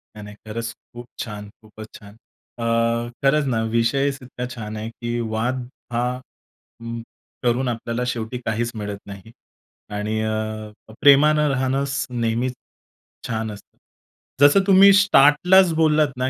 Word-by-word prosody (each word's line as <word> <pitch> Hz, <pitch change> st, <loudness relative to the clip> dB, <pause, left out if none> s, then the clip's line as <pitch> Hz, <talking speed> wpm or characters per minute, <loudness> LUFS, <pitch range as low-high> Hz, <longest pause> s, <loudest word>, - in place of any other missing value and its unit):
नाही-नाही 105 Hz, -1 st, -10 dB
खरंच 115 Hz, +1 st, -5 dB, 0.2 s
खूप 120 Hz, 0 st, -9 dB
छान. 105 Hz, -2 st, -6 dB
खूपच 110 Hz, 0 st, -12 dB
छान. 100 Hz, -1 st, -15 dB, 0.4 s
अ, -, -, -3 dB, 0.6 s
खरंच 145 Hz, +2 st, +3 dB
ना 110 Hz, -, 0 dB
विषयच 135 Hz, +4 st, +1 dB
इतका 125 Hz, 0 st, -7 dB
छान 110 Hz, -2 st, -6 dB
आहे, 110 Hz, +1 st, -5 dB
की 120 Hz, +1 st, -4 dB
वाद 120 Hz, +3 st, -2 dB, 0.3 s
हा 120 Hz, +1 st, 0 dB, 0.8 s
उम्म 115 Hz, 0 st, -6 dB, 0.4 s
करून 125 Hz, +2 st, +1 dB
आपल्याला 115 Hz, +1 st, -3 dB
शेवटी 120 Hz, 0 st, -3 dB
काहीच 115 Hz, +2 st, -1 dB
मिळत 105 Hz, -2 st, -5 dB
नाही. 100 Hz, +2 st, -11 dB, 0.6 s
आणि 105 Hz, +1 st, -2 dB
अ, 110 Hz, 0 st, -3 dB, 0.3 s
प्रेमानं 150 Hz, +2 st, +5 dB
राहणंच 135 Hz, +1 st, -1 dB
नेहमीच 120 Hz, +1 st, -1 dB, 0.7 s
छान 110 Hz, -1 st, -3 dB
असतं. 105 Hz, -, -14 dB, 0.6 s
जसं 145 Hz, +7 st, +7 dB
तुम्ही 195 Hz, 0 st, +8 dB
स्टार्टलाच 180 Hz, -1 st, +5 dB
बोललात 155 Hz, -1 st, +3 dB
ना 130 Hz, +1 st, 0 dB
120 Hz, 130 wpm, -22 LUFS, 110-140 Hz, 0.8 s, तुम्ही